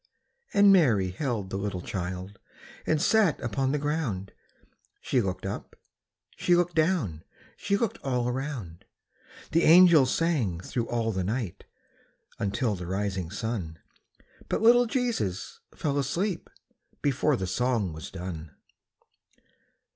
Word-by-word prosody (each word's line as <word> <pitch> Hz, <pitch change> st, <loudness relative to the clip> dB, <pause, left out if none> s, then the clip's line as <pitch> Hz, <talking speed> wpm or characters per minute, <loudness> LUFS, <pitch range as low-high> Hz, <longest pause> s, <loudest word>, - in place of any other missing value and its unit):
And 200 Hz, -1 st, +6 dB
Mary 110 Hz, -, +3 dB
held 105 Hz, -3 st, -3 dB
the 95 Hz, -, -2 dB
little 95 Hz, -3 st, -3 dB
child 95 Hz, +1 st, -5 dB, 0.5 s
And 155 Hz, -, +2 dB
sat 200 Hz, 0 st, +3 dB
upon 130 Hz, +3 st, -1 dB
the 150 Hz, -, +1 dB
ground; 140 Hz, -11 st, -2 dB, 0.7 s
She 130 Hz, -, +1 dB
looked 95 Hz, -2 st, -3 dB
up, 100 Hz, -, -6 dB, 0.6 s
she 175 Hz, -, +3 dB
looked 175 Hz, 0 st, +1 dB
down, 155 Hz, -, 0 dB, 0.3 s
She 200 Hz, -, 0 dB
looked 225 Hz, -1 st, -2 dB
all 125 Hz, -3 st, -1 dB
around. 125 Hz, -, -5 dB, 0.7 s
The 165 Hz, -, +3 dB
angels 165 Hz, -5 st, +7 dB
sang 135 Hz, -, 0 dB
thro' 115 Hz, +6 st, -3 dB
all 115 Hz, -2 st, -1 dB
the 95 Hz, -3 st, -2 dB
night 110 Hz, -1 st, -3 dB, 0.7 s
Until 105 Hz, +3 st, 0 dB
the 90 Hz, -3 st, -6 dB
rising 95 Hz, -2 st, -2 dB
sun, 100 Hz, -6 st, -4 dB, 0.7 s
But -, -, -1 dB
little 240 Hz, +1 st, +6 dB
Jesus 225 Hz, -, -2 dB, 0.2 s
fell 145 Hz, -2 st, -1 dB
asleep 170 Hz, +7 st, -2 dB, 0.5 s
Before 145 Hz, +1 st, +2 dB
the 95 Hz, -, -3 dB
song 110 Hz, -2 st, 0 dB
was 80 Hz, -, -8 dB
done. 85 Hz, -5 st, -7 dB
120 Hz, 125 wpm, -27 LUFS, 95-155 Hz, 0.7 s, angels